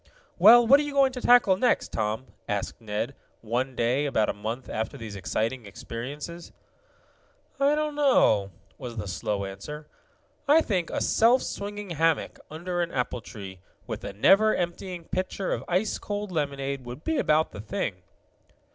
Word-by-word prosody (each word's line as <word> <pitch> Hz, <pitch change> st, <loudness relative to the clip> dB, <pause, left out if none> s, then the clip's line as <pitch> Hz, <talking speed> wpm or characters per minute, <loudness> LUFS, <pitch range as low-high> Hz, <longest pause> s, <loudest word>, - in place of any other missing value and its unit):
"Well, 230 Hz, +6 st, +9 dB
what 275 Hz, +5 st, +7 dB
are -, -, +1 dB
you 290 Hz, -1 st, -5 dB
going 275 Hz, -1 st, +4 dB
to 250 Hz, -1 st, -6 dB
tackle 240 Hz, -7 st, +5 dB
next, 245 Hz, +4 st, +1 dB
Tom?" 110 Hz, +3 st, -2 dB, 0.2 s
asked 105 Hz, +3 st, -3 dB
Ned, 110 Hz, +4 st, -3 dB, 0.3 s
one 125 Hz, +4 st, -2 dB
day 125 Hz, +5 st, +1 dB
about 110 Hz, -6 st, +1 dB
a -, -, 0 dB
month 110 Hz, +5 st, -5 dB
after 110 Hz, 0 st, -3 dB
these 110 Hz, -3 st, -7 dB
exciting 110 Hz, +4 st, -2 dB
experiences. 145 Hz, -, -7 dB, 1.1 s
"I 280 Hz, +2 st, +4 dB
don't 305 Hz, 0 st, -1 dB
know," 255 Hz, -, +3 dB, 0.3 s
was 120 Hz, -4 st, -7 dB
the 105 Hz, -1 st, -4 dB
slow 100 Hz, +3 st, -2 dB
answer. 150 Hz, +11 st, -8 dB, 0.6 s
"I 305 Hz, +3 st, +6 dB
think 185 Hz, -, -1 dB
a -, -, -2 dB
self 240 Hz, +3 st, +4 dB
swinging 205 Hz, -1 st, -5 dB
hammock, 165 Hz, 0 st, 0 dB
under 175 Hz, +3 st, -3 dB
an 170 Hz, -1 st, -2 dB
apple 125 Hz, -2 st, -2 dB
tree, 95 Hz, -3 st, -9 dB, 0.3 s
with -, -, -6 dB
a -, -, -4 dB
never 195 Hz, -, +5 dB
emptying 175 Hz, 0 st, -4 dB
pitcher 185 Hz, +2 st, -3 dB
of -, -, -3 dB
ice 185 Hz, +5 st, 0 dB
cold 205 Hz, -1 st, -4 dB
lemonade 140 Hz, -4 st, -2 dB
would 125 Hz, +4 st, -9 dB
be 320 Hz, -3 st, 0 dB
about 155 Hz, -5 st, +2 dB
the 105 Hz, -, -8 dB
thing." 100 Hz, -3 st, -3 dB
150 Hz, 165 wpm, -27 LUFS, -, 1.1 s, Well